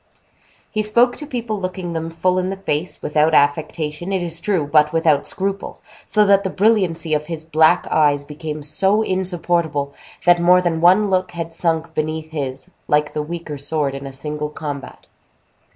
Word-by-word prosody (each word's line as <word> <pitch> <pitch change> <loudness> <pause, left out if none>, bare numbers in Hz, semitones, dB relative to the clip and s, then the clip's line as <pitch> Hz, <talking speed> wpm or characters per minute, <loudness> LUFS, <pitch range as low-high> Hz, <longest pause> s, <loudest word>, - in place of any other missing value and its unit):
He 215 - 0
spoke 235 +4 +3
to 295 - -8
people 235 -6 -3
looking 185 -2 -4
them 165 0 -3
full 180 +3 0
in 185 0 -1
the 195 - -3
face, 175 -3 -3
without 155 +1 +2
affectation, 150 +4 0
it 190 -2 0
is 165 -1 -4
true, 175 -3 0
but 150 +1 +3
without 160 -3 +2
scruple; 195 +1 -3 0.3
so 210 0 +3
that 200 0 +4
the 190 - -1
brilliancy 185 -6 +1
of 150 0 -1
his 165 -2 -5
black 160 0 +3
eyes 145 -2 +3
became 150 +1 -7
so 195 +8 +2
insupportable, 175 -6 -1 0.3
that 175 -1 +5
more 180 +1 +6
than 170 -3 -1
one 190 +4 +5
look 185 -1 0
had 165 -1 -5
sunk 165 -1 -1
beneath 155 0 -3
his, 135 -4 -5 0.2
like 150 0 +1
the 150 - -1
weaker 155 -2 -6
sword 145 -1 -1
in 135 0 -6
a - - -7
single 150 +2 -4
combat. 145 -4 -7
165 Hz, 175 wpm, -20 LUFS, 150-185 Hz, 0.3 s, more